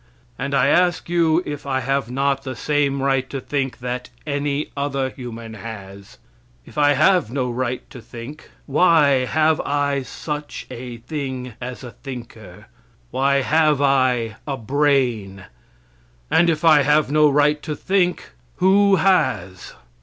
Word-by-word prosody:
And 140 Hz, 0 st, -2 dB
I 135 Hz, -, +3 dB
ask 175 Hz, +1 st, +2 dB
you 170 Hz, 0 st, +3 dB
if 145 Hz, -1 st, -6 dB
I 130 Hz, -1 st, 0 dB
have 135 Hz, -1 st, -1 dB
not 135 Hz, +1 st, 0 dB
the 130 Hz, -2 st, -6 dB
same 140 Hz, +1 st, 0 dB
right 135 Hz, -1 st, +1 dB
to 135 Hz, -, -4 dB
think 135 Hz, 0 st, -3 dB
that 125 Hz, 0 st, -4 dB, 0.2 s
any 145 Hz, 0 st, -2 dB
other 140 Hz, -2 st, -2 dB
human 115 Hz, -3 st, -8 dB
has? 100 Hz, -3 st, -10 dB, 0.5 s
If -, -, -15 dB
I 145 Hz, -1 st, +4 dB
have 170 Hz, -, +3 dB
no 125 Hz, -1 st, -2 dB
right 125 Hz, 0 st, -3 dB
to 125 Hz, -, -10 dB
think, 120 Hz, +6 st, -10 dB, 0.2 s
why 145 Hz, -4 st, +4 dB
have 155 Hz, +2 st, +2 dB
I 145 Hz, -1 st, 0 dB
such 150 Hz, +3 st, -6 dB
a 125 Hz, -1 st, -7 dB
thing 130 Hz, -1 st, -5 dB
as 125 Hz, +1 st, -6 dB
a 120 Hz, -, -8 dB
thinker. 115 Hz, -9 st, -10 dB, 0.5 s
Why 140 Hz, +1 st, +2 dB
have 155 Hz, -1 st, +3 dB
I 130 Hz, -5 st, +1 dB
a 135 Hz, -2 st, -2 dB
brain? 120 Hz, -7 st, 0 dB, 0.9 s
And 170 Hz, 0 st, +4 dB
if 160 Hz, 0 st, -1 dB
I 155 Hz, -3 st, +7 dB
have 150 Hz, 0 st, +2 dB
no 150 Hz, 0 st, +5 dB
right 150 Hz, +1 st, +2 dB
to 155 Hz, -1 st, -4 dB
think, 185 Hz, 0 st, 0 dB, 0.2 s
who 195 Hz, +2 st, +4 dB
has? 105 Hz, -, 0 dB
140 Hz, 145 wpm, -21 LUFS, 125-150 Hz, 0.9 s, I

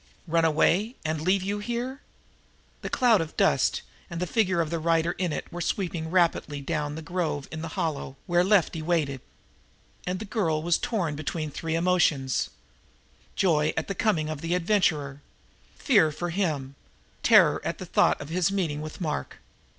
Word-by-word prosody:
"Run 165 Hz, -1 st, +2 dB
away 180 Hz, -, +2 dB
and 155 Hz, -1 st, -1 dB
leave 185 Hz, +3 st, +2 dB
you 200 Hz, +2 st, -2 dB
here?" 240 Hz, +5 st, -4 dB, 0.8 s
The -, -, -4 dB, 0.5 s
dust -, -, +3 dB
cloud -, -, -13 dB, 0.2 s
and 170 Hz, -2 st, -5 dB
the 180 Hz, -, 0 dB
figure 190 Hz, -2 st, +1 dB
of 165 Hz, -2 st, 0 dB
the 170 Hz, -, -1 dB
rider 165 Hz, +1 st, +2 dB
in 180 Hz, -3 st, 0 dB
it 150 Hz, -, -5 dB
were 175 Hz, -, -4 dB
sweeping 170 Hz, -4 st, -2 dB
rapidly 165 Hz, -4 st, +1 dB
down 150 Hz, +1 st, -2 dB
on 145 Hz, 0 st, -5 dB
the 160 Hz, -, -7 dB
grove 160 Hz, -4 st, -2 dB
in 160 Hz, 0 st, -5 dB
the 165 Hz, -, -4 dB
hollow, 140 Hz, -4 st, -2 dB
where 175 Hz, 0 st, +3 dB
Lefty 180 Hz, -4 st, +2 dB
waited. 155 Hz, -5 st, 0 dB, 0.9 s
And 180 Hz, +1 st, -1 dB
the 220 Hz, -, -6 dB
girl 170 Hz, -8 st, 0 dB
was 170 Hz, 0 st, +2 dB
torn 180 Hz, -10 st, -1 dB
between 155 Hz, 0 st, -4 dB
three 160 Hz, +2 st, -3 dB
emotions: 165 Hz, -6 st, +2 dB, 0.9 s
Joy 155 Hz, -5 st, +2 dB
at 160 Hz, -, -1 dB
the 195 Hz, -, -2 dB
coming 180 Hz, -7 st, +1 dB
of 155 Hz, -2 st, -5 dB
the 165 Hz, +2 st, 0 dB
adventurer, 160 Hz, -7 st, +1 dB, 0.5 s
fear 200 Hz, -, +3 dB
for 175 Hz, +3 st, -4 dB
him, 155 Hz, -8 st, -1 dB, 0.5 s
terror -, -, +5 dB
at -, -, -3 dB
the -, -, -7 dB
thought -, -, +3 dB
of 145 Hz, -, -8 dB
his 175 Hz, +2 st, +1 dB
meeting 165 Hz, -7 st, -1 dB
with 155 Hz, +4 st, -8 dB
Mark. 155 Hz, -3 st, -3 dB
165 Hz, 175 wpm, -26 LUFS, 155-185 Hz, 0.9 s, terror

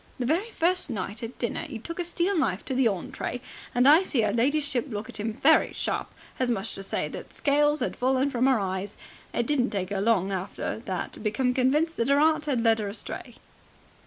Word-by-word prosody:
The 250 Hz, -, -2 dB
very 340 Hz, -, 0 dB
first 360 Hz, -5 st, +1 dB
night 205 Hz, -1 st, -4 dB
at 230 Hz, +1 st, -7 dB
dinner 240 Hz, +6 st, -2 dB
'e 255 Hz, -, -5 dB
took 335 Hz, +10 st, -7 dB
a -, -, +1 dB
steel 350 Hz, +3 st, 0 dB
knife 205 Hz, -, 0 dB
to -, -, -3 dB
the 255 Hz, -1 st, +3 dB
ontray, 210 Hz, +4 st, -3 dB, 0.4 s
and 245 Hz, +2 st, +5 dB
I 305 Hz, +5 st, +8 dB
see 260 Hz, -, +1 dB
'er 205 Hz, -, 0 dB
ladyship 280 Hz, +2 st, +1 dB
look 215 Hz, -1 st, -5 dB
at 215 Hz, -, -7 dB
him 215 Hz, +1 st, -2 dB
very 310 Hz, +7 st, +4 dB
sharp, -, -, -2 dB, 0.3 s
as 255 Hz, -1 st, +1 dB
much 215 Hz, -5 st, -1 dB
as -, -, -2 dB
to 195 Hz, -, -4 dB
say -, -, -1 dB
that -, -, -9 dB
scales 295 Hz, +1 st, +2 dB
had -, -, -1 dB
fallen 265 Hz, +2 st, +1 dB
from 255 Hz, 0 st, +2 dB
'er 260 Hz, -, +4 dB
eyes. 190 Hz, +1 st, -3 dB, 0.3 s
It 235 Hz, -, 0 dB
didn't 260 Hz, -2 st, +1 dB
take 195 Hz, -3 st, -3 dB
'er 195 Hz, -1 st, -1 dB
long 200 Hz, -3 st, +2 dB
after 190 Hz, +3 st, -3 dB
that 185 Hz, -2 st, -3 dB
to -, -, -10 dB
become 235 Hz, +4 st, 0 dB
convinced 295 Hz, +6 st, +1 dB
that 230 Hz, -, 0 dB
'er 280 Hz, +1 st, +5 dB
'eart 310 Hz, 0 st, +3 dB
'ad 260 Hz, -5 st, +1 dB
led 225 Hz, -1 st, +3 dB
'er 205 Hz, -, -3 dB
astray." 200 Hz, +2 st, -6 dB
250 Hz, 225 wpm, -27 LUFS, 215-295 Hz, 0.4 s, I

